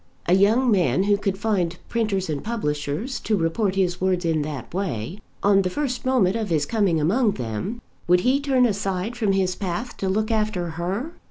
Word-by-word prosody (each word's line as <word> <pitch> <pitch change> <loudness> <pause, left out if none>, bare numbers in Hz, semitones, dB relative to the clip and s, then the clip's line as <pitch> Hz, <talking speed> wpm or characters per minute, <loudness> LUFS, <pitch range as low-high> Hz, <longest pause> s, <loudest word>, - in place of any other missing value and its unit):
A 175 - +3
young 220 +6 +4
man 180 - +3
who 205 0 +3
could 195 -1 -2
find 190 -5 0
printers 210 -5 -1
and 150 -3 -3
publishers 195 - -2
to 215 - 0
report 185 +4 0
his 180 -2 0
words 185 -2 +1
in 160 -2 +1
that 145 -2 -6
way, 175 - -3 0.2
on 200 -1 +5
the 185 - -1
first 255 +3 -3
moment 220 -7 +3
of 220 -3 -2
his 155 -3 +1
coming 200 -6 +1
among 205 - +2
them, 125 - -4 0.3
would 180 +1 +5
he 260 +6 +3
turn 270 -3 +3
aside 200 0 -1
from 215 -5 +1
his 185 -1 +1
path 205 +6 -4
to 190 - -1
look 215 +4 0
after 215 -6 0
her? 185 - -3
195 Hz, 190 wpm, -23 LUFS, 175-220 Hz, 0.3 s, on